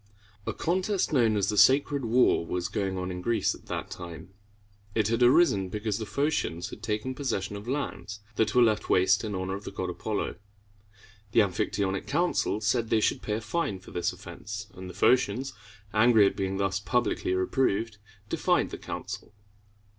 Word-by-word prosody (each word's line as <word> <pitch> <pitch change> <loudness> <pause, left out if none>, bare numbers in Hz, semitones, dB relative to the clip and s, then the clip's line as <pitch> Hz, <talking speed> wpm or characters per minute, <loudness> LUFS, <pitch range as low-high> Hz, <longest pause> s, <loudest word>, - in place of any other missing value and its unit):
A - - +1
contest 185 +2 0
known 115 -6 +3
as 100 -1 +1
the 105 - -1
Sacred 140 0 +4
War 120 -5 +4
was 90 +1 -3
going 95 -2 -2
on 90 0 -3
in 90 0 -5
Greece 115 +4 +1
at - - -15
that - - -4
time. 85 -1 -8 0.7
It 110 -1 +2
had 115 +1 0
arisen 120 - +4
because 105 +1 -2
the 110 - -3
Pho´cians 140 - -1
had - - -10
taken 110 +3 -2
possession 115 -8 -2
of 100 +3 -8
lands 125 -6 -4 0.2
that 110 - +1
were 125 - +7
left 110 -2 +1
waste 95 +1 +4
in 105 -2 -3
honor 95 0 -2
of 100 +2 -5
the - - -5
god 95 -2 -4
Apollo. 105 +4 -3 1.0
The - - +6
Amphictyonic 100 0 -1
Council 160 - +1
said 110 +2 +1
they 110 - +3
should - - +1
pay 105 - -3
a 110 - -2
fine 110 - -2
for 95 - -14
this 85 - -1
offense; 105 0 -8
and 95 0 -9
the 90 - -10
Phocians, 125 +4 +2 0.4
angry 110 -1 +6
at 100 - +1
being 95 0 -2
thus 95 -1 0
publicly 115 -4 0
reproved, 105 +2 0 0.3
defied - - +1
the - - -6
council. - - -7
105 Hz, 180 wpm, -28 LUFS, 95-120 Hz, 1.0 s, were